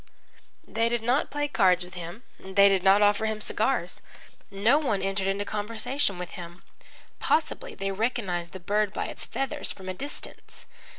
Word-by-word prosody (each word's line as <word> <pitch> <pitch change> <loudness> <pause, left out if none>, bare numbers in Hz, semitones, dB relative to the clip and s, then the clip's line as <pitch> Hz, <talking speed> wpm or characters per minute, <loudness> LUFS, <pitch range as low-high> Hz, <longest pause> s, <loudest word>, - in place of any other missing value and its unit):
They 230 +1 +1
did 235 -1 -1
not 250 +5 +2
play 290 0 -1
cards 185 -9 +4
with 180 - -13
him, 175 +6 -7 0.2
they 200 +1 +5
did 195 -2 +3
not 195 +2 +6
offer 205 +2 +3
him 220 -1 -2
cigars. 215 -4 0 0.5
No 215 +9 +3
one 215 -10 0
entered 195 0 -1
into 200 +1 0
conversation 215 +2 -2
with 180 -1 -6
him. 175 +1 -9 0.6
Possibly 415 +10 0
they 195 0 -2
recognised 195 -5 -1
the 190 - -8
bird 205 +3 0
by - - -2
its - - -3
feathers 270 -2 -3
from 190 -1 -10
a - - -2
distance. 280 +10 -8
205 Hz, 170 wpm, -27 LUFS, 190-230 Hz, 0.6 s, not